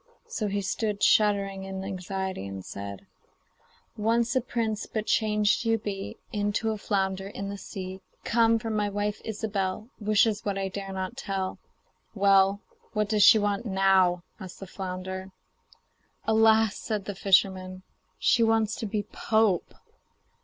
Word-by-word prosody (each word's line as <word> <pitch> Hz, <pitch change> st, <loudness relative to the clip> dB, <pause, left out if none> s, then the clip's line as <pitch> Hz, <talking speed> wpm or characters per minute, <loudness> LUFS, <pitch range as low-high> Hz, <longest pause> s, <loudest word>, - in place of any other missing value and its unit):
So 215 Hz, -, -3 dB
he 200 Hz, 0 st, -1 dB
stood 205 Hz, +1 st, -2 dB
shuddering 200 Hz, -2 st, +3 dB
in 190 Hz, 0 st, -5 dB
anxiety, 190 Hz, -, -4 dB
and 95 Hz, -1 st, -7 dB
said: 100 Hz, -1 st, -7 dB, 0.9 s
'Once 230 Hz, +3 st, +1 dB
a 260 Hz, -, +3 dB
prince, 225 Hz, -3 st, -2 dB
but 215 Hz, -1 st, -3 dB
changed 210 Hz, -1 st, +2 dB
you 225 Hz, -1 st, +2 dB
be 200 Hz, -2 st, -5 dB, 0.2 s
Into 205 Hz, +1 st, 0 dB
a 215 Hz, -, -3 dB
flounder 190 Hz, -1 st, -1 dB
in 200 Hz, 0 st, -5 dB
the 200 Hz, -, -5 dB
sea. 190 Hz, 0 st, -7 dB, 0.2 s
Come! 230 Hz, 0 st, +3 dB
for 225 Hz, 0 st, -4 dB
my 210 Hz, -1 st, 0 dB
wife, 205 Hz, +1 st, -2 dB
Ilsebel, 210 Hz, -1 st, -3 dB
Wishes 215 Hz, 0 st, +2 dB
what 200 Hz, -1 st, -2 dB
I 195 Hz, 0 st, -1 dB
dare 195 Hz, 0 st, -6 dB
not 190 Hz, +5 st, -4 dB
tell.' 195 Hz, -7 st, -3 dB, 0.6 s
'Well, 195 Hz, 0 st, +4 dB, 0.3 s
what 210 Hz, -2 st, 0 dB
does 210 Hz, -1 st, +2 dB
she 215 Hz, -, +9 dB
want 205 Hz, +2 st, 0 dB
now?' 190 Hz, -3 st, +3 dB, 0.2 s
asked 185 Hz, -1 st, -9 dB
the 195 Hz, -, -7 dB
flounder. 190 Hz, 0 st, -5 dB, 1.0 s
'Alas!' 220 Hz, -1 st, +4 dB
said 210 Hz, -4 st, -3 dB
the 205 Hz, -, -4 dB
fisherman, 185 Hz, -1 st, +2 dB, 0.3 s
'she 240 Hz, -, +3 dB
wants 225 Hz, -1 st, +3 dB
to 220 Hz, -, -3 dB
be 205 Hz, 0 st, -2 dB
pope. 215 Hz, -3 st, +1 dB
200 Hz, 145 wpm, -27 LUFS, 190-220 Hz, 1.0 s, she